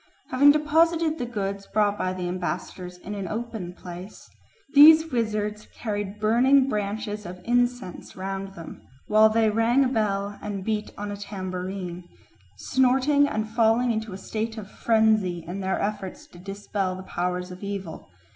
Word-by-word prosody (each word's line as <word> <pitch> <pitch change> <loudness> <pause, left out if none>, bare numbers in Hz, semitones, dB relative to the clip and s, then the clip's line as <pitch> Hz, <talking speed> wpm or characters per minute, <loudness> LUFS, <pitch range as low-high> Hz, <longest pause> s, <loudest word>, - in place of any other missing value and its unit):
Having 285 +3 +7
deposited 320 +1 +2
the 245 - -2
goods 200 -3 -4
brought 205 -1 +2
by 185 -2 -1
the 185 -1 -4
ambassadors 180 0 -4
in 190 +3 -7
an 200 -2 -4
open 220 -4 -4
place, 180 +3 -10 0.5
these 315 +2 +8
wizards 215 -3 -2
carried 205 -2 -4
burning 255 +5 +4
branches 210 -2 -3
of 180 -1 -8
incense 245 -4 -1
round 195 +1 -5
them, 165 -1 -10 0.2
while 215 +1 +5
they 220 0 +3
rang 235 +5 +3
a - - +3
bell 205 -4 -1
and 200 -2 -4
beat 215 0 -2
on 205 0 -4
a 205 - -5
tambourine, 185 -2 -5 0.5
snorting 265 - +3
and 215 -5 -2
falling 230 +2 +3
into 220 -1 -3
a 185 - -6
state 220 +3 -4
of 205 -2 -8
frenzy 215 -6 +2
in 180 +3 -5
their 190 0 -1
efforts 205 +8 -4
to 175 - -16
dispel 195 0 -3
the 185 - -8
powers 180 0 -3
of 180 - -10
evil. 195 - -6
210 Hz, 155 wpm, -25 LUFS, 190-235 Hz, 0.5 s, these